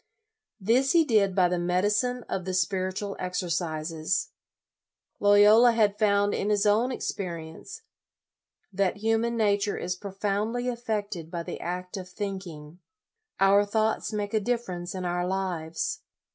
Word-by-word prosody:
This 240 Hz, +7 st, +2 dB
he 335 Hz, -2 st, +5 dB
did 205 Hz, -7 st, +2 dB
by 185 Hz, -2 st, +4 dB
the 180 Hz, 0 st, -1 dB
medicine 210 Hz, +8 st, 0 dB
of 185 Hz, -, -3 dB
the 185 Hz, +1 st, -3 dB
Spiritual 185 Hz, +2 st, -1 dB
Exercises. 170 Hz, -2 st, -2 dB, 0.9 s
Loyola 210 Hz, +4 st, +6 dB
had 210 Hz, -2 st, +2 dB
found 205 Hz, -1 st, +3 dB
in 205 Hz, -, -1 dB
his 205 Hz, 0 st, +2 dB
own 220 Hz, +5 st, +3 dB
experience 175 Hz, -, -6 dB, 0.9 s
that 195 Hz, 0 st, 0 dB
human 225 Hz, +2 st, 0 dB
nature 205 Hz, -1 st, +1 dB
is 180 Hz, +1 st, -3 dB
profoundly 205 Hz, +5 st, -2 dB
affected 210 Hz, -8 st, -3 dB
by 170 Hz, -1 st, -4 dB
the -, -, -6 dB
act 180 Hz, +3 st, -4 dB
of 185 Hz, -1 st, -7 dB
think 195 Hz, 0 st, -5 dB
ing. 150 Hz, +1 st, -11 dB, 0.6 s
Our 195 Hz, +1 st, +5 dB
thoughts 220 Hz, +2 st, 0 dB
make 205 Hz, -1 st, -3 dB
a 220 Hz, -, +3 dB
difference 195 Hz, -6 st, -3 dB
in 185 Hz, -1 st, -4 dB
our 175 Hz, 0 st, -1 dB
lives. 180 Hz, -4 st, -2 dB
200 Hz, 135 wpm, -27 LUFS, 180-215 Hz, 0.9 s, Loyola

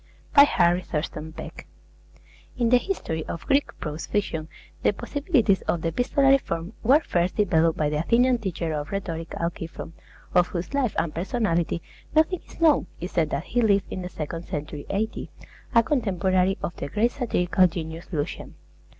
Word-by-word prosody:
BY 285 Hz, -, +9 dB
HARRY 175 Hz, -8 st, +3 dB
THURSTON 155 Hz, -1 st, -4 dB
PECK -, -, -9 dB, 0.9 s
In 235 Hz, -2 st, +2 dB
the 250 Hz, -, +7 dB
history 205 Hz, -, -3 dB
of 170 Hz, -, -6 dB
Greek 280 Hz, +1 st, +1 dB
prose 150 Hz, 0 st, -5 dB
fiction 160 Hz, -6 st, -1 dB, 0.3 s
the -, -, +3 dB
possibilities 275 Hz, -, +1 dB
of 170 Hz, -, 0 dB
the 165 Hz, -, +1 dB
epistolary 270 Hz, -, +3 dB
form 170 Hz, -3 st, -4 dB
were 270 Hz, +7 st, +5 dB
first 175 Hz, -, 0 dB
developed 165 Hz, -5 st, +3 dB
by 150 Hz, -, +1 dB
the 150 Hz, 0 st, -1 dB
Athenian 245 Hz, +8 st, +3 dB
teacher 170 Hz, -6 st, -3 dB
of 150 Hz, -1 st, -3 dB
rhetoric, 170 Hz, -5 st, -4 dB
Alciphron, 165 Hz, -1 st, -4 dB, 0.4 s
of 180 Hz, 0 st, +5 dB
whose 175 Hz, +6 st, -5 dB
life 270 Hz, -6 st, +1 dB
and 155 Hz, -, 0 dB
personality 175 Hz, -3 st, 0 dB, 0.3 s
nothing 320 Hz, +3 st, +3 dB
is -, -, -15 dB
known 315 Hz, -, +4 dB
except 170 Hz, -3 st, 0 dB
that 145 Hz, -, -2 dB
he 245 Hz, +5 st, 0 dB
lived 200 Hz, -3 st, +3 dB
in 185 Hz, -, -4 dB
the 180 Hz, -, -5 dB
second 165 Hz, +1 st, -5 dB
century 150 Hz, -1 st, -5 dB
A.D., 215 Hz, +3 st, -2 dB, 0.5 s
a 230 Hz, -, +7 dB
contemporary 190 Hz, -, +1 dB
of 175 Hz, -, -3 dB
the 140 Hz, -, -4 dB
great 220 Hz, +9 st, +1 dB
satirical 185 Hz, -8 st, +2 dB
genius 165 Hz, -1 st, -6 dB
Lucian. 150 Hz, -1 st, -4 dB
180 Hz, 165 wpm, -25 LUFS, 165-235 Hz, 0.9 s, BY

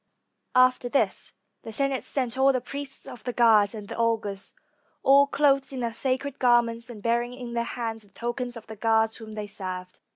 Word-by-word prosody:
After 255 Hz, -1 st, +4 dB
this, 275 Hz, -, 0 dB, 0.3 s
the 225 Hz, -, -8 dB
Senate 275 Hz, +3 st, 0 dB
sent 255 Hz, -4 st, 0 dB
all 265 Hz, +1 st, +5 dB
the 255 Hz, -, 0 dB
priests 275 Hz, +2 st, -7 dB
of 245 Hz, -5 st, -10 dB
the 245 Hz, -, -3 dB
gods, 220 Hz, -3 st, +4 dB
and 210 Hz, -2 st, -8 dB
the -, -, -6 dB
augurs, 220 Hz, -4 st, -1 dB, 0.5 s
all 280 Hz, +1 st, +6 dB
clothed 275 Hz, -2 st, +2 dB
in 260 Hz, -2 st, -4 dB
their 235 Hz, -1 st, -2 dB
sacred 260 Hz, +3 st, -2 dB
garments, 240 Hz, -1 st, +2 dB
and 215 Hz, -4 st, -10 dB
bearing 235 Hz, +1 st, +1 dB
in 245 Hz, -2 st, -7 dB
their 235 Hz, 0 st, 0 dB
hands 230 Hz, -2 st, -4 dB
the 205 Hz, -, -20 dB
tokens 240 Hz, +3 st, -4 dB
of 230 Hz, -, -11 dB
the 220 Hz, -, -9 dB
gods 225 Hz, 0 st, +2 dB
whom 220 Hz, -2 st, -10 dB
they 210 Hz, -1 st, -4 dB
served. 185 Hz, -3 st, -7 dB
235 Hz, 195 wpm, -26 LUFS, 220-255 Hz, 0.5 s, all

